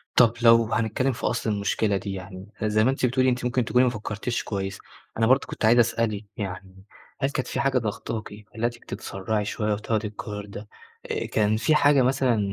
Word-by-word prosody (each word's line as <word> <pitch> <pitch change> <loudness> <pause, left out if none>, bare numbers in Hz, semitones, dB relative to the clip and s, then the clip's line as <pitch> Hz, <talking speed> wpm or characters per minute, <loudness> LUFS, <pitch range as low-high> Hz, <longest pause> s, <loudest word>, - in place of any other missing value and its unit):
طَب 115 -2 +6
لو 115 -1 +5
هنتكلم 115 +4 +1
في 115 - -6
أصل 115 -1 -1
المشكلة 100 0 0
دي 95 0 -5
يعني، 95 0 -8 0.2
زي 110 0 +2
ما 130 - +4
أنتِ 135 - 0
بتقولي 130 +1 +2
أنتِ 125 0 -1
ممكن 125 0 +1
تكوني 125 +1 +3
ما - - +3
فكرتيش 110 +1 -3
كويس، 100 -1 -4 0.4
أنا 110 0 +3
برضه 130 +3 +3
كنت - - -3
عايز 115 +2 +6
أسألِك 115 -3 +1
يعني 95 -1 -7 0.4
هل 135 - +2
كانت 130 -2 -3
في - - -3
حاجة 135 -1 +2
ضاغطاكِ 110 -1 -4 0.2
خلتِك 120 +1 -3
تتسرعي 105 +2 -3
شوية 105 0 -1
وتاخدي 105 +1 -1
القرار 105 0 -7
ده؟ 105 +1 -9 0.4
آآ - - -2
كان 110 0 +1
فيه 115 +8 +2
حاجة 145 -2 +5
مثلًا 130 -2 +2
110 Hz, 190 wpm, -25 LUFS, 105-125 Hz, 0.4 s, طَب